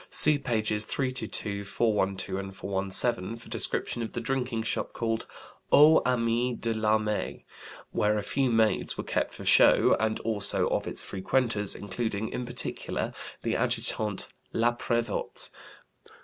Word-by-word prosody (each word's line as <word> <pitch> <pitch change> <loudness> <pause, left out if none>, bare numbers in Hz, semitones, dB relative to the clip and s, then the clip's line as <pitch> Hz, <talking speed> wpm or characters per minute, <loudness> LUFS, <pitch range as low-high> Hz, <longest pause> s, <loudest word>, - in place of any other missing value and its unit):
See 150 -1 +7
pages 110 -5 0
322, 110 -7 -3
412, 100 -3 -1
and 95 0 -7
417 100 +3 +1
for 115 - -14
description 120 - -1
of 115 - -5
the - - -3
drinking 125 -1 -2
shop - - -2
called 115 -1 -2 0.4
'Aux 155 +2 +7
Amis 120 0 0
de 115 -1 -1
l'Armée,' 110 -1 -1 0.5
where 105 0 +1
a 105 - -2
few 130 +4 0
maids 110 -2 +1
were - - -3
kept - - -2
for - - -10
show, - - +6
and 110 0 0
also 110 -3 +1
of - - -1
its - - 0
frequenters, 105 +1 0
including, 105 +1 -4
in 125 - -5
particular, 120 0 -2 0.3
the - - -1
Adjutant 105 -3 +1 0.3
Laprévotte. 120 -1 -1
110 Hz, 135 wpm, -27 LUFS, 105-120 Hz, 0.5 s, See